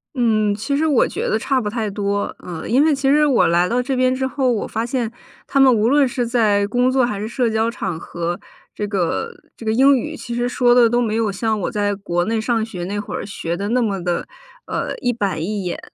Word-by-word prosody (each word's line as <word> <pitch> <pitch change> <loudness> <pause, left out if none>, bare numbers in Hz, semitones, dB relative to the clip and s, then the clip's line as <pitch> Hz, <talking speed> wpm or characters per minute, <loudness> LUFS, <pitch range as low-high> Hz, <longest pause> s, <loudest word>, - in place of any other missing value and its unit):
嗯， 215 -4 +2
其 250 +7 -2
实 315 - +1
我 290 -6 +3
觉 - - -3
得 220 - +1
差 265 +2 +1
不 210 - -3
太 220 -1 -2
多， 200 0 -2
嗯。 170 -3 -6
因 255 +5 +4
为 315 - +4
其 270 0 0
实 300 +1 +4
我 275 -5 +3
来 175 +1 +3
到 245 +1 +1
这 265 +1 -2
边 255 0 +2
之 260 0 -1
后， 260 -2 0
我 220 - -1
发 225 +1 -2
现 240 -2 -2 0.4
他 275 - +1
们 265 -2 +7
无 220 +1 +2
论 285 -1 +4
是 245 0 -2
在 210 -4 +2
工 245 +3 +2
作 260 -1 +3
还 210 -4 -1
是 210 - -3
社 235 +1 0
交 220 +1 +1
场 185 -7 -4
合， 170 +2 -4 0.4
这 210 - -2
个 200 - -1 0.3
这 225 - -10
个 220 - +1
英 270 +3 +5
语 305 +5 -4
其 240 -4 -6
实 240 0 0
说 245 -1 +3
得 240 -2 +6
都 240 +1 +1
没 220 -2 -1
有 220 -3 +1
像 220 +1 -1
我 - - -2
在 205 -1 0
国 175 -3 -1
内 225 +2 0
上 225 0 0
学 195 -6 -6
那 200 +3 -3
会 205 - -5
儿 - - -4
学 175 -4 -4
得 200 +2 -3
那 245 +2 +2
么 195 -5 -1
的， 175 -1 -2 0.4
呃， - - -3
一 245 - +1
板 195 -9 -2
一 205 +2 -3
眼。 180 - -3
225 Hz, 270 characters per minute, -20 LUFS, 205-250 Hz, 0.4 s, 们